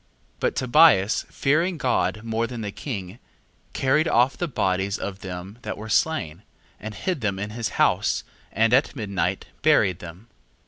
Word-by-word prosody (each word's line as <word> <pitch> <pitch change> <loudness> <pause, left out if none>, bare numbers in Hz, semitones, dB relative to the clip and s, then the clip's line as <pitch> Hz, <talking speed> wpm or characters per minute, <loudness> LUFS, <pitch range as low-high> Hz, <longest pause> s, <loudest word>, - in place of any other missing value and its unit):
2:9. - - -38
But - - 0
Tobias 125 -6 +4
fearing 165 +6 +1
God 105 -6 0
more 115 0 -1
than 120 -2 -6
the 105 -2 -4
king, 100 -4 -6 0.5
carried 150 +5 +2
off 125 0 +3
the 175 - -2
bodies 95 - 0
of 100 -1 -5
them 95 +3 -8
that - - -5
were 110 +2 -8
slain, 105 - 0 0.4
and 110 -1 -7
hid 175 - -2
them 100 -3 -1
in 105 +2 -4
his 115 -2 -3
house, - - +2 0.3
and 115 +1 +2
at 135 +4 +3
midnight 100 -6 -2 0.2
buried 90 -2 +3
them. 85 +5 -10
110 Hz, 165 wpm, -24 LUFS, 95-130 Hz, 0.5 s, Tobias